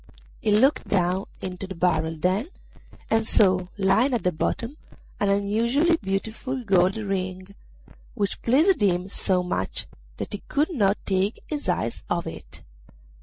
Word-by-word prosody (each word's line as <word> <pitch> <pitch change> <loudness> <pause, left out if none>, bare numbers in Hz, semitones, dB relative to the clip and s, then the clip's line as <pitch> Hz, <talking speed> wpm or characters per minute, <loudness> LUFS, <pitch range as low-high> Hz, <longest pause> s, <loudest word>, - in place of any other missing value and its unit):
He 215 - 0
looked 260 +8 +3
down 185 0 +1 0.2
into 185 0 -5
the 190 - -7
barrel 160 -2 +1
then, 185 - 0 0.6
and 225 0 +2
saw 185 -3 +3
lying 220 +7 +3
at 235 - -2
the 180 - +2
bottom 230 - -2 0.4
an 205 - +2
unusually 230 +11 +2
beautiful 220 +6 -3
gold 190 -1 +3
ring, 185 -2 -3 0.7
which 200 -4 -2
pleased 305 - +3
him 180 -2 +2
so 185 -2 +1
much 95 - -2 0.3
that - - -5
he 205 - -5
could 300 +4 +1
not 205 -7 +2
take 195 +2 0
his 295 -9 -4
eyes 115 -10 -1
off - - 0
it. - - -8
200 Hz, 145 wpm, -25 LUFS, 185-230 Hz, 0.7 s, looked